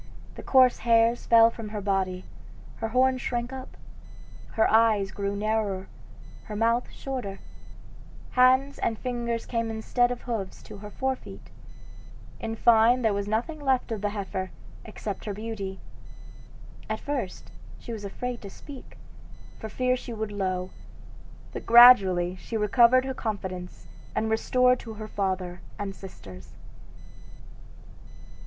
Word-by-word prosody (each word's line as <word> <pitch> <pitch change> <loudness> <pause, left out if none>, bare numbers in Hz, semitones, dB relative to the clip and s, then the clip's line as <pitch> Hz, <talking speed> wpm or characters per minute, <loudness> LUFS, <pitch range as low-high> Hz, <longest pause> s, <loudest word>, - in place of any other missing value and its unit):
The - - -9
coarse 255 -2 +4
hairs 230 0 +3
fell 230 0 +7
from 225 -2 -8
her 210 0 -4
body, 190 -2 -1 0.5
her 225 - -2
horns 255 +2 +2
shrank 240 +1 -3
up, 260 -1 -9 0.8
her 220 - +3
eyes 220 -3 +3
grew 200 0 -3
narrower, 205 -2 -1 0.6
her 210 - -7
mouth 230 +3 +1
shorter; 250 -8 -5 0.9
hands 260 +2 +4
and 225 - -1
fingers 235 -2 -3
came 230 -1 -2
instead 225 +2 +1
of 245 -1 -5
hoofs 225 -6 -5
to - - -10
her 210 +1 -9
forefeet; 265 +4 -5 0.9
in 225 0 -4
fine 235 +2 +4
there 220 -2 +3
was 200 0 -2
nothing 235 +9 -2
left 265 -4 0
of 215 -3 -3
the 205 - 0
heifer, 190 -2 -4 0.4
except 210 -2 -6
her 205 -2 -4
beauty. 205 -3 -5 1.1
At 220 0 -2
first 275 -10 -5 0.3
she 235 - -8
was 215 -2 -7
afraid 245 +4 -5
to 200 - -8
speak, 275 +6 -12 0.6
for 220 - -6
fear 255 +3 +1
she 250 -1 -7
should 220 -1 -4
low, 185 -2 -2 0.8
but - - -7
gradually 195 -7 +7
she 225 +5 -5
recovered 235 +4 +4
her 265 - -3
confidence 190 -6 -5 0.3
and - - 0
was 220 0 +1
restored 250 0 +3
to 225 -2 -9
her 215 0 -7
father 185 -3 -3 0.2
and 200 -1 -4
sisters. 95 - -12
220 Hz, 140 wpm, -26 LUFS, 200-245 Hz, 1.1 s, fell